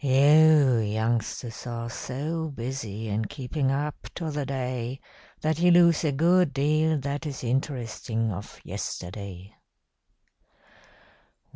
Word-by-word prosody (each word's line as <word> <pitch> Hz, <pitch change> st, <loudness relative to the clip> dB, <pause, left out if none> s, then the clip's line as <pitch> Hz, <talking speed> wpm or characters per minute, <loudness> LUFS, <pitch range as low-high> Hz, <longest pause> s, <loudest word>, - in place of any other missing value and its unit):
You 145 Hz, 0 st, +6 dB
youngsters 115 Hz, +2 st, -2 dB
are 115 Hz, -1 st, -4 dB
so 150 Hz, +7 st, -4 dB
busy 115 Hz, -5 st, -5 dB
in 105 Hz, +1 st, -1 dB
keeping 135 Hz, +3 st, -2 dB
up 145 Hz, +2 st, -3 dB
to 165 Hz, -3 st, -3 dB
the 145 Hz, -2 st, -3 dB
day 130 Hz, -1 st, -3 dB, 0.4 s
that 155 Hz, 0 st, 0 dB
you 175 Hz, +1 st, +5 dB
lose 170 Hz, -2 st, +5 dB
a 155 Hz, -, +2 dB
good 170 Hz, +2 st, +3 dB
deal 155 Hz, +3 st, +2 dB
that 145 Hz, +3 st, -3 dB
is 140 Hz, -3 st, -6 dB
interesting 120 Hz, -3 st, -2 dB
of 100 Hz, +2 st, -8 dB
yesterday. 95 Hz, +1 st, -6 dB
135 Hz, 115 wpm, -26 LUFS, 115-150 Hz, 0.4 s, You